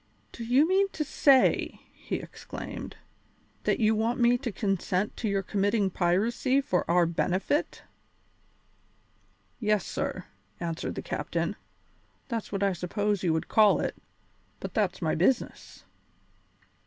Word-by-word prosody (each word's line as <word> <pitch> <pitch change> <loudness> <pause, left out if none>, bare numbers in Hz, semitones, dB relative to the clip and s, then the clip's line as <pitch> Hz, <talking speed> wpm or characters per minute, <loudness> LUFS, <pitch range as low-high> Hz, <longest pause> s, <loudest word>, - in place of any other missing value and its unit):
"Do 235 - -7
you 255 +7 +4
mean 390 +2 +3
to 305 - -1
say," 275 -3 +3
he - - -5
exclaimed, - - -7 0.7
"that - - +2
you 220 -1 +4
want 225 +3 0
me 240 0 +5
to 245 -1 -3
consent 195 -1 -1
to 220 - -1
your 195 -1 0
committing 200 0 +1
piracy 220 +10 +1
for 185 -12 -1
our 175 0 +4
benefit?" 185 - -1 1.8
"Yes, 210 -3 +1
sir," - - -3 0.3
answered 165 -1 -3
the - - -5
captain, - - -2 0.7
"that's 230 -3 -3
what 200 -1 -1
I 195 -1 +2
suppose 200 +3 -1
you 175 - +1
would 160 - -2
call 215 -2 +5
it; - - -2 0.6
but - - -6
that's 190 -4 0
my 160 - +1
business." 210 +10 -1
205 Hz, 130 wpm, -28 LUFS, 185-240 Hz, 1.8 s, me